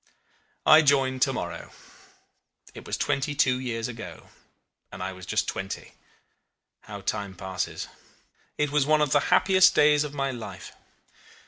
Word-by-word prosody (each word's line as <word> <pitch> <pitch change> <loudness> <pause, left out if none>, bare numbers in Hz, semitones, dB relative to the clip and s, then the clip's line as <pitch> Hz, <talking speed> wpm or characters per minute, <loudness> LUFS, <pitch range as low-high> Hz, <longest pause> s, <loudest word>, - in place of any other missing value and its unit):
"I 155 +1 +8
joined 135 -3 +2
to 135 - +3
morrow. - - -6 1.0
It - - -11
was - - -2
twenty 140 +2 -1
two 130 -3 +2
years 115 -3 -3
ago; 115 -9 -9 0.6
and 95 0 -7
I 95 +1 -4
was 90 -1 -12
just - - 0
twenty. - - -5 0.9
How - - -9
time 100 -2 -3
passes! 95 0 -4 0.7
It 150 -1 0
was 145 -1 +2
one 155 0 +3
of 150 -3 +1
the 145 - +5
happiest 185 0 +5
days 150 0 +5
of 145 -1 -7
my 135 -1 -1
life. 120 -3 -9
135 Hz, 145 wpm, -26 LUFS, 115-150 Hz, 1.0 s, I